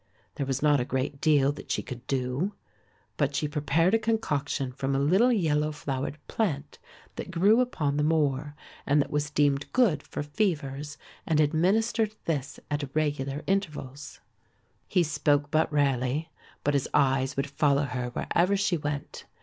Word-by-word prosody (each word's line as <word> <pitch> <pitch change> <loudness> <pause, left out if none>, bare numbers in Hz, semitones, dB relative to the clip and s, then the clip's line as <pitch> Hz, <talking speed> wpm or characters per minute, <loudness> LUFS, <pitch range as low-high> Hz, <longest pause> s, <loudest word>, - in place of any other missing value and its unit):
There 140 - -3
was 135 +1 -1
not 145 -2 +4
a - - +1
great 130 +2 -3
deal 145 -3 +4
that 145 - -10
she - - -1
could 125 -2 -9
do; 135 +9 -1 0.6
but 140 -1 0
she 150 - 0
prepared 150 +5 +1
a 225 - +5
concoction 150 - -1
from 135 +2 -2
a - - +2
little 190 - +4
yellow 155 -8 +1
flowered 140 -1 -4
plant 150 -10 -2 0.4
that - - -5
grew 205 +8 +4
upon 150 - -1
the 150 - +2
moor 150 -2 +1 0.3
and 145 +1 +4
that 140 - 0
was 150 0 0
deemed 145 -1 +1
good 210 - +3
for - - -5
fevers 145 -4 -2 0.3
and 155 -2 +2
administered 210 +8 +2
this 145 -4 -2
at 145 -2 -2
regular 145 -2 -1
intervals. 150 -8 -3 0.7
He 180 -2 +3
spoke 145 -1 +1
but 160 0 +2
rarely, 140 +2 0 0.3
but 145 - +1
his 140 -2 0
eyes 135 -1 +2
would 140 - +1
follow 140 0 +2
her 125 -2 -3
wherever 180 +10 +1
she 190 -3 +1
went. 145 -2 -5
145 Hz, 160 wpm, -27 LUFS, 140-165 Hz, 0.7 s, a